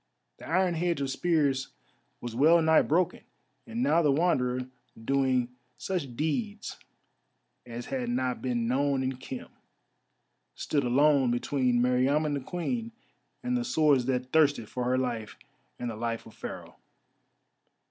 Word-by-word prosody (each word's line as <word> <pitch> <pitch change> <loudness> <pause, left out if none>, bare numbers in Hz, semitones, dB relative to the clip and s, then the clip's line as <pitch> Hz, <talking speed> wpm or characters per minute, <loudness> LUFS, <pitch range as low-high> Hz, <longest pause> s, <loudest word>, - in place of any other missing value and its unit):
The - - -11
iron 180 +1 +2
hedge 170 -1 0
of 135 -1 -2
spears 145 -5 +1 0.5
was 120 -2 -5
well 160 +7 +6
nigh 160 -1 +5
broken, 175 +3 +1 0.5
and 235 +1 -2
now 170 -10 +4
the 150 -3 +3
Wanderer, 130 -5 +1 0.4
doing 130 -2 +2 0.3
such 155 -10 -3
deeds 205 - -3 0.9
as 120 0 -6
had 125 -3 -3
not 125 +1 -1
been 120 -3 -1
known 135 +1 +1
in 130 0 -2
Khem, 130 0 -8 1.1
stood 145 -2 -1
alone 135 +1 +4
between 120 0 +1
Meriamun 135 +5 +2
the 140 - -1
Queen 225 - -3 0.5
and 250 0 0
the 245 - 0
swords 155 - +3
that 130 -1 -1
thirsted 145 -8 +3
for 125 -1 -3
her 125 +1 +2
life 120 -4 -3 0.4
and 120 -1 -3
the - - -6
life 115 +1 -3
of 110 - -13
Pharaoh. - - -8
135 Hz, 140 wpm, -28 LUFS, 125-160 Hz, 1.1 s, well